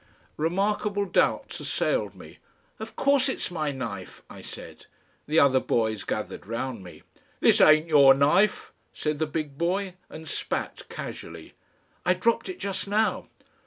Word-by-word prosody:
Remarkable 200 +5 0
doubts 185 - 0
assailed - - -1
me. - - -13 0.4
"Of - - -8
course 280 -1 +3
it's 260 - -3
my 155 -4 -1
knife," 115 -8 -7
I - - -10
said. - - -10 0.4
The 155 +2 0
other 135 -2 +5
boys 110 -4 0
gathered - - -4
round 115 -1 -4
me. 90 - -13 0.4
"This - - +5
ain't 155 +1 +6
your 140 -4 +7
knife," 150 +9 +2 0.2
said 150 -1 -2
the 155 - 0
big 150 -2 -4
boy, 185 +2 0 0.2
and 160 0 -10
spat - - -4
casually. 80 -1 -8 0.5
"I 180 - +3
dropped 230 - 0
it 370 - -5
just 200 0 -3
now." 215 +2 +1
155 Hz, 145 wpm, -26 LUFS, 135-200 Hz, 0.5 s, your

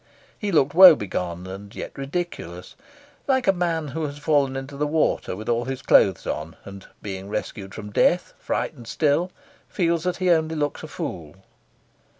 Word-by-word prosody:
He 205 -2 -2
looked 145 -4 +3
woebegone 100 - +6
and 100 +4 -9
yet - - -7
ridiculous, 135 - -5 0.5
like 260 -2 +2
a - - +6
man 165 -4 -1
who 160 +5 -4
has 145 0 -8
fallen 145 -3 +1
into 135 +1 -6
the 150 +1 -1
water 155 - 0
with 110 +3 -8
all 120 0 +1
his 135 0 -5
clothes 95 -3 +4
on, 80 +2 -4
and, 100 -1 -10 0.2
being 95 -1 -6
rescued 105 -2 -5
from 105 0 -7
death, 180 - +2
frightened 120 -7 -3
still, 160 +6 +1 0.4
feels 170 -3 0
that 180 - 0
he 185 -1 +2
only 160 -1 +2
looks 145 -1 -2
a 155 - -7
fool. 80 - -6
140 Hz, 165 wpm, -24 LUFS, 100-165 Hz, 0.5 s, woebegone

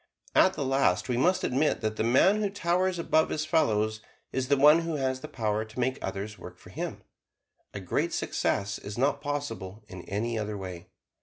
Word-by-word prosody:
At 190 - +5
the 140 - -2
last 130 -10 +2
we 125 - +1
must 180 +10 +2
admit 140 +4 +1
that 110 -1 -1
the 110 - -1
man 185 - +4
who 205 - +1
towers 185 -1 0
above 160 -1 +2
his 155 0 -2
fellows 110 -9 +1 0.3
is 130 -1 -1
the 140 +1 +3
one 150 +4 +7
who 165 -1 -3
has 130 -2 -1
the - - -7
power 110 -2 -1
to 110 +3 -10
make 130 +2 0
others 105 0 -5
work - - -10
for - - -15
him; - - -5 0.7
a 105 - -6
great 90 -3 -1
success 100 0 -1
is 100 +2 -7
not 135 +4 +1
possible 115 -9 -4
in 95 -4 -9
any 110 +3 -1
other 105 -1 -3
way. 90 -3 -7
125 Hz, 200 wpm, -28 LUFS, 105-150 Hz, 0.7 s, one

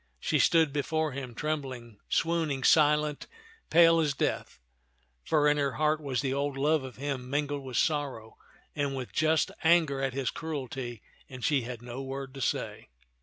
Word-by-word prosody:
She - - 0
stood 160 -4 +4
before 155 +1 -1
him, 130 -3 -6
trembling, 130 -8 -4
swooning, 160 -5 0
silent, 150 -1 +3 0.4
pale 165 0 +6
as 150 -3 +1
death; - - -2 0.7
for 150 -2 +2
in 150 0 +3
her 140 -2 0
heart 155 0 +1
was 135 -4 -1
the 135 -1 -1
old 140 0 -2
love 150 +1 +2
of 130 -2 -8
him 135 -2 -4
min 145 +2 +1
gled 145 0 -4
with 130 -3 -5
sorrow 140 -8 -1 0.4
and 140 -2 -1
with 130 -2 -6
just 155 +1 +2
anger 160 -5 +3
at 135 -1 -1
his 135 -1 -1
cruelty, 130 -7 -5 0.3
and 130 -2 -6
she 145 -3 +2
had 120 -1 -7
no 120 +2 -6
word 135 0 -6
to 135 - -8
say. - - -2
140 Hz, 170 wpm, -29 LUFS, 130-155 Hz, 0.7 s, pale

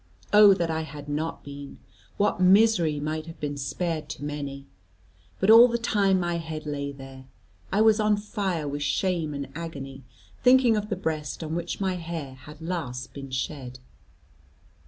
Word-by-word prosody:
Oh 205 -2 +8
that 170 -2 -1
I 160 0 -1
had 150 -2 -8
not 150 +3 -3
been! 140 0 -9 0.4
What 205 -2 +1
misery 185 -5 +4
might 155 +2 -3
have 165 - -10
been 145 -1 -3
spared 150 +3 -3
to 145 - -7
many. 140 -2 -5 0.7
But 195 +3 +4
all 230 +2 +10
the 235 -1 -1
time 200 -5 +2
my 175 -1 -1
head 160 -2 -6
lay 140 -1 -3
there, 135 -1 -11 0.5
I 205 - +2
was 220 0 +5
on 210 -1 +3
fire 195 -7 -2
with 145 +1 -4
shame 165 -1 0
and 140 -1 -5
agony, 140 -4 -7 0.4
thinking 250 -2 +5
of 210 0 -2
the 200 - -1
breast 160 -4 -3
on 160 0 -4
which 175 +1 -3
my 190 -2 -1
hair 165 -5 -6
had 150 +4 -13
last 130 -8 -4
been 135 -1 -8
shed. 130 -1 -4
160 Hz, 170 wpm, -26 LUFS, 145-190 Hz, 0.7 s, all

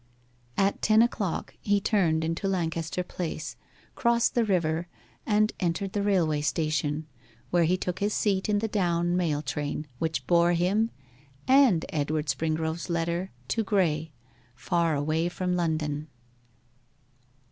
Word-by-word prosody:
At 195 0 +1
ten 220 +1 +5
o'clock 205 -7 -2
he 205 0 +2
turned 175 -6 +2
into 165 +5 -1
Lancaster 170 -2 -1
Place, 170 -3 -5 0.4
crossed 235 -1 +2
the 240 - +3
river, 170 -4 0 0.4
and 215 0 +3
entered 180 +2 -1
the 205 - 0
railway 175 -7 +2
station, 155 -1 -1 0.5
where 175 -1 +4
he 180 +3 +2
took 180 0 -3
his 205 +1 0
seat 200 -2 0
in 205 - +3
the 220 +2 0
down 175 -4 +1
mail 155 -5 0
train, 145 +2 -3
which 160 -1 -2
bore 170 0 +4
him, 195 +6 +2 0.6
and 260 - +5
Edward 150 0 -1
Springrove's 160 +4 -1
letter 170 +2 -1 0.2
to 225 - +1
Graye, 165 -7 +1 0.5
far 170 +2 +1
away 155 +4 0
from 180 0 -2
London. 155 -3 -1
170 Hz, 135 wpm, -27 LUFS, 160-195 Hz, 0.6 s, ten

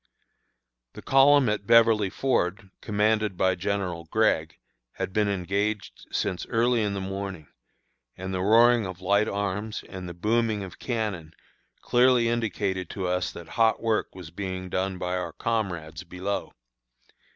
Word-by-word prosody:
The - - -11
column 135 0 +5
at 105 -2 -1
Beverly 115 -3 +5
Ford, 100 -4 -1
commanded 105 -2 +1
by 95 0 +3
General 90 -2 -3
Gregg, 80 -4 +1 0.4
had 95 - -4
been 105 0 +2
engaged 100 +2 -2
since 90 - -2
early 120 0 +2
in 100 -2 -1
the - - -2
morning, 95 -4 -5 0.7
and 95 +1 -5
the 95 - -1
roaring 115 +2 +5
of 95 -1 -8
light 100 +3 +2
arms 100 +2 -3
and 95 -2 -7
the 85 - -8
booming 110 +2 0
of 95 - -10
cannon 105 -10 -3 0.5
clearly 125 -1 +4
indicated 100 -5 -1
to 95 - -4
us 90 0 -1
that 85 - -10
hot 115 -1 +2
work 110 -4 -1
was 90 -3 -10
being 95 0 -5
done 95 0 -1
by 90 0 -2
our 90 - -4
comrades 85 -8 -3
below. 90 +3 -4
100 Hz, 145 wpm, -26 LUFS, 90-110 Hz, 0.7 s, column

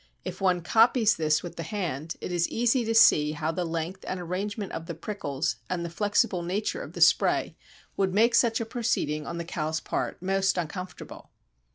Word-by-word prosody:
If - - -6
one 180 -2 +2
copies 225 +3 +4
this 155 -1 +1
with 175 -1 -8
the - - -3
hand 165 -4 -4
it - - -4
is 175 -1 +1
easy 240 +2 +2
to 225 0 -1
see 150 -9 +6
how 155 +1 -2
the 180 +2 -2
length 165 +3 -4
and 185 - -3
arrangement 195 +4 -4
of 165 0 -6
the 170 - -5
prickles 160 -6 -3
and 175 -2 -2
the 170 - -6
flexible 205 -1 +1
nature 190 +5 -2
of - - -9
the - - -6
spray - - +3 0.4
would 195 -1 +1
make 225 +5 +3
such 235 -1 +3
a 230 - -2
proceeding 220 - -1
on 170 - -4
the 170 - -4
cow's 160 -2 -2
part - - -3
most 195 +1 +1
uncomfortable. 180 +2 -6
180 Hz, 195 wpm, -27 LUFS, 165-210 Hz, 0.4 s, see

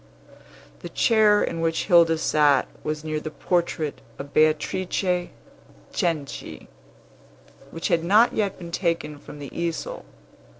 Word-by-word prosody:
The - - -8
chair 215 -3 +4
in 165 - -3
which 165 0 0
Hilda 170 -3 +5
sat 150 -3 +3 0.2
was 155 0 -3
near 155 -1 -2
the 155 - -6
portrait 165 -2 -2 0.2
of 140 +1 -9
Beatrice 175 +4 +1 0.6
Cenci, 160 -5 -3 1.0
which 165 - -4
had 165 -1 +2
not 210 +7 +4
yet 205 -3 -1
been 170 -2 -9
taken 165 -4 -2
from 145 - -11
the 140 -2 -9
easel. 170 -1 -3
165 Hz, 125 wpm, -24 LUFS, 155-180 Hz, 1.0 s, Hilda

